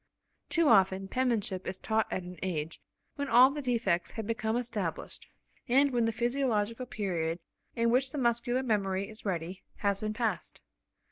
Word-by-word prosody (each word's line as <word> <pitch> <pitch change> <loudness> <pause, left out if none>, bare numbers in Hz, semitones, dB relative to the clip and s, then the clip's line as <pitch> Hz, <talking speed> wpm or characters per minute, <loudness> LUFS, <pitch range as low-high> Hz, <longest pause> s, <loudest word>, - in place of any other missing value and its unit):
Too 335 -2 +3
often, 195 -4 +4
penmanship 220 -6 -1
is 185 - -3
taught 220 +2 0
at 185 - -2
an 180 0 -10
age 160 -4 -3 0.4
when 285 0 -2
all 255 +1 +7
the 295 +1 -4
defects 210 -10 0
have 225 - -5
become 225 0 -1
established, 215 -8 -4 0.4
and 275 +3 +4
when 240 -2 +2
the 225 - +1
physiological 240 -1 -1
period 175 -7 -2 0.4
in 230 0 +2
which 260 +2 +2
the 295 - -5
muscular 240 0 +1
memory 200 -4 0
is 215 0 -11
ready, 180 -1 -3
has 200 -1 0
been 215 0 -2
passed. 225 -1 -2
220 Hz, 160 wpm, -30 LUFS, 190-245 Hz, 0.4 s, all